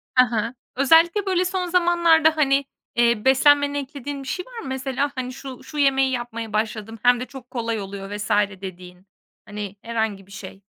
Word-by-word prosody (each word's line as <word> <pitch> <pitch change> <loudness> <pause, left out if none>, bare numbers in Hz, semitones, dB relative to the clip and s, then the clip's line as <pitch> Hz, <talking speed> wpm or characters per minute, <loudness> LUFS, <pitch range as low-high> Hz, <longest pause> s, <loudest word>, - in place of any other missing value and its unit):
Ha 255 0 +6
ha. 230 +1 -1 0.2
Özellikle 330 +9 +4
böyle 370 -1 +1
son 365 0 -2
zamanlarda, 340 -3 +4
hani, 280 -2 +3 0.3
eee, 235 -2 +2
beslenmene 285 +2 +4
eklediğin 280 0 -6
bir - - -11
şey 365 +6 -3
var - - -9
mı? - - -7
Mesela, 265 +1 -2
hani, 255 -1 -4
şu 265 -1 -9
şu 305 - -9
yemeği 270 -2 +3
yapmaya 230 -3 -4
başladım 220 +1 -2
hem 245 0 +5
de 250 - -4
çok 255 -2 -12
kolay 230 -3 -2
oluyor 195 0 -7
vs. 210 +1 -5 0.3
dediğin, 180 -1 -10 0.4
hani, 205 -1 -6
herhangi 220 -4 -3
bir - - -18
şey. 195 -1 -10
255 Hz, 180 wpm, -23 LUFS, 220-290 Hz, 0.4 s, Ha